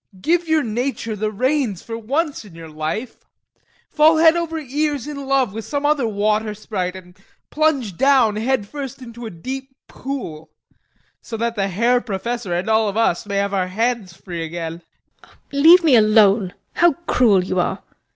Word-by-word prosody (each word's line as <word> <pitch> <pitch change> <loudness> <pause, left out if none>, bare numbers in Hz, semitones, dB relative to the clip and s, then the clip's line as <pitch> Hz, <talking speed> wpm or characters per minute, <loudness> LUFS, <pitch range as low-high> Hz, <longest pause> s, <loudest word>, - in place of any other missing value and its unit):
Give 340 - +1
your 315 -1 +2
nature 230 0 -3
the 215 +1 -2
reins 255 - -1
for 225 - -6
once 280 +7 -2
in 195 -6 -15
your 165 -1 -10
life; 155 +10 -4 0.7
fall 315 +1 +4
head 320 +1 +6
over 335 -1 -2
ears 290 -2 -2
in 280 -2 -7
love 265 -6 +1
with 225 +1 -5
some 285 +3 -3
other 290 -5 +2
water 215 0 0
sprite 190 -4 -4
and 180 -1 -12 0.4
plunge 280 - 0
down 265 -6 +4
head 225 -2 0
first 275 0 -7
into 235 -1 -8
a - - -6
deep 265 +9 -7
pool, 235 - -6 0.7
so 225 - -6
that 230 +1 -2
the 195 -2 0
Herr 235 +6 +2
Professor 230 -1 -4
and 175 +3 -1
all 220 -1 +2
of 200 - -5
us 210 -4 +1
may 200 - -3
have 200 0 0
our 185 -2 0
hands 225 0 -1
free 170 -1 -7
again. 165 0 -5 0.4
HELENA. - - -22
[Angrily] 280 0 -1
Leave 355 +1 +8
me 300 -6 +5
alone! 210 -3 +4 0.2
How 345 -2 +4
cruel 215 - +3
you 185 0 -2
are! 175 - -1
225 Hz, 180 wpm, -20 LUFS, 195-275 Hz, 0.7 s, Leave